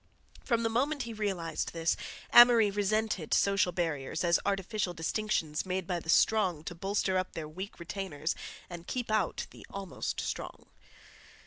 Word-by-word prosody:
From 235 -2 +1
the 225 - +2
moment 275 +6 0
he 235 - -6
realized 195 -6 -2
this 165 -1 +1 0.4
Amory 240 -3 +8
resented 205 -3 0
social 195 -2 +3
barriers 165 -6 -2
as 170 -1 +4
artificial 195 -1 -1
distinctions 165 -3 -1
made 185 -1 -2
by 175 -1 -1
the 160 - -11
strong 185 -4 +3
to 175 - -5
bolster 190 +1 0
up 185 - -4
their 160 -2 -5
weak 185 +6 -8
retainers 170 -3 -3 0.3
and 175 -1 -9
keep 245 -3 -3
out 215 -1 0
the - - -13
almost 195 -2 -4
strong. - - -5
190 Hz, 150 wpm, -31 LUFS, 170-215 Hz, 0.4 s, Amory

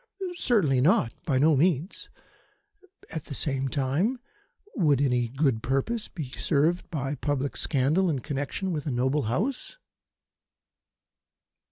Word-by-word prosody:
"Certainly 195 - +2
not. 130 -6 +3
By 135 -5 +2
no 150 +3 +4
means. 165 +4 0 1.0
At 160 - -5
the 140 - -6
same 135 0 0
time, 140 - 0 0.6
would 150 - +3
any 125 -4 +1
good 135 -2 0
purpose 135 - -1
be 150 -8 -7
served 160 +6 +1
by 140 -3 -3
public 140 0 -2
scandal 150 +8 +1
in 150 - 0
connection 145 +7 -3
with 155 -3 -3
a - - 0
noble 130 +3 0
House?" 245 - -2
145 Hz, 125 wpm, -27 LUFS, 135-170 Hz, 1.0 s, no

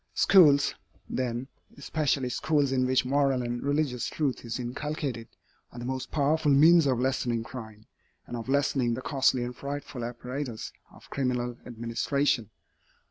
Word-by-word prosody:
Schools, 145 -7 +6 0.3
then, 125 0 -2 0.3
especially 140 -2 0
schools 145 +1 +1
in 130 -1 +2
which 130 0 +2
moral 135 -1 +2
and 120 0 -3
religious 140 -4 0
truth 145 -5 -2
is 115 +1 -4
inculcated, 130 -1 -4 0.4
are - - -13
the 120 - -5
most 130 0 -3
powerful 150 +1 +1
means 160 +3 +6
of 130 -3 +1
lessening 125 -3 0
crime, 110 -3 -9 0.4
and 120 - -6
of 115 +1 -6
lessening 135 -4 +1
the 130 - -6
costly 130 -2 +2
and 125 0 -5
frightful 140 -2 -6
apparatus 125 0 -5 0.2
of - - -17
criminal 125 -3 -1
administration. 120 +1 -1
130 Hz, 140 wpm, -28 LUFS, 120-140 Hz, 0.4 s, Schools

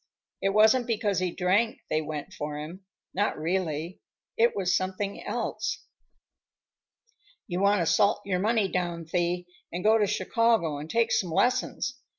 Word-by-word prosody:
It 195 - +2
wasn't 220 +5 +4
because 210 -5 0
he 185 -1 0
drank 195 +6 +1
they 155 - +2
went 150 -1 -6
for 150 0 -5
him; 170 +6 -8 0.3
not 205 +3 0
really. 165 0 -2 0.4
It 235 +1 +3
was 180 -2 +1
something 190 +2 -2
else." - - -3 1.6
"You 180 +1 -3
want 200 -1 +4
to - - +1
salt 180 +7 +3
your 185 -2 0
money 215 0 +2
down, 175 -3 -2
Thee, 175 +1 -1 0.3
and 175 +2 -4
go 220 +1 +5
to 205 - +3
Chicago 190 -6 +1
and 150 +2 -8
take 230 +2 +1
some 180 - +1
lessons. 255 +6 0
185 Hz, 155 wpm, -27 LUFS, 170-215 Hz, 1.6 s, go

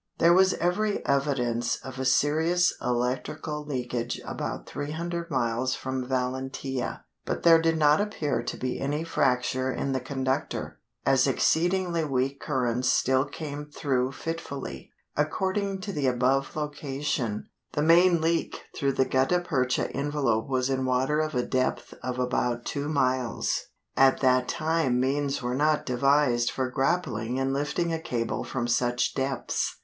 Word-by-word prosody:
There 170 +1 +5
was 190 +1 +5
every 205 +5 0
evidence 125 -4 +1
of 130 0 -9
a 130 - -1
serious 160 +6 +3
electrical 125 +5 -2
leakage 125 -4 -3
about - - -4
300 170 +4 -4
miles 130 -1 0
from 130 -1 -4
Valentia, 130 0 -3 0.2
but - - -3
there 165 -1 +7
did 165 0 +2
not 150 +2 +4
appear 155 - -1
to 120 - -5
be 130 0 -3
any 145 +3 -1
fracture 130 -4 +1
in 135 - -2
the 130 - 0
conductor, 130 0 -3 0.3
as 135 0 +4
exceedingly 170 +4 +2
weak 135 -1 -1
currents 125 -3 0
still 130 +1 +3
came 145 0 -6
through 135 -3 -1
fitfully. 140 - -6 0.2
According 190 +6 -1
to 200 - -4
the 145 -3 0
above 130 +2 +1
location, 140 -6 -3 0.2
the 150 - 0
main 170 +1 +5
leak 165 +1 -1
through 140 -2 0
the 130 - +2
gutta 135 +8 +2
percha 130 -8 0
envelope 140 -6 0
was 130 -1 +1
in 130 -1 0
water 130 +4 +1
of 155 -2 -1
a 125 - +1
depth 130 -2 -1
of 125 0 -3
about 125 -1 0
two 145 0 -3
miles. 130 -5 0 0.3
At 135 0 +5
that 130 -1 +3
time 155 -6 +1
means 140 +1 0
were 125 0 -1
not 150 +3 +2
devised 125 -1 +3
for 130 -1 -2
grappling 130 -5 0
and 135 0 0
lifting 150 +4 -1
a 165 - -1
cable 115 -6 -2
from 120 -2 -3
such 120 0 +1
depths. 135 -2 -1
135 Hz, 145 wpm, -27 LUFS, 125-155 Hz, 0.3 s, there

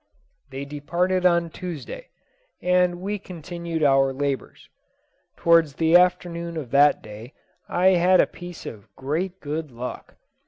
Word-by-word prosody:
They 135 +1 -6
departed 175 +6 0
on 170 -1 +1
Tuesday, 180 - -7 0.5
and 180 -1 +2
we 205 +2 -3
continued 170 -2 -5
our 135 -1 +4
labours. 140 0 -4 0.7
Towards 165 -4 +4
the 165 +2 +3
afternoon 170 -2 +2
of 140 -7 -6
that 145 +1 +4
day, 110 +4 -11 0.3
I 180 +2 +3
had 185 0 +4
a - - +6
piece 175 -1 -10
of 105 -3 -9
great 170 +8 -3
good 155 +1 -4
luck. 125 0 -8
170 Hz, 130 wpm, -24 LUFS, 140-180 Hz, 0.7 s, a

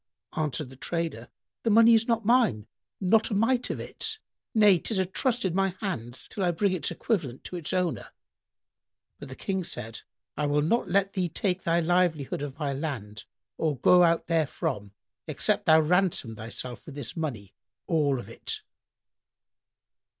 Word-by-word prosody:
Answered 150 -3 -2
the - - -12
trader, 160 -4 -3 0.3
"The 230 - 0
money 230 +2 +7
is 225 0 +4
not 230 -2 0
mine, 230 - +3 0.3
not 215 +3 +3
a 210 - -1
mite 240 +4 +2
of - - -3
it; 445 -1 -2 0.4
nay, 205 -5 +6
'tis 215 +4 0
a 190 - +2
trust 225 +6 0
in 185 - 0
my 195 0 +1
hands 125 - -3
till 200 - -4
I 180 - +3
bring 190 +4 +1
its 180 - -1
equivalent 155 - -2
to - - -7
its 170 -4 -4
owner." 180 -7 -1 1.1
But - - -9
the 130 - -8
King 190 +3 -2
said, 115 -8 -5 0.3
"I 150 0 0
will 145 0 +2
not 230 +10 +1
let 195 +1 +2
thee 180 -3 0
take 185 +1 -1
thy 170 +1 +2
livelihood 165 -5 +1
of 145 -1 -5
my 145 -3 -2
land 115 -8 -5 0.3
or 155 -4 0
go 180 +8 +6
out 170 -1 +3
therefrom, 155 - -1 0.3
except - - 0
thou 160 0 +7
ransom 165 -8 +1
thyself 115 +4 -6
with 145 - -9
this 140 -6 -5
money 120 - -4 0.3
all 150 -5 +2
of 120 - -7
it." - - -5
170 Hz, 170 wpm, -27 LUFS, 140-195 Hz, 1.1 s, money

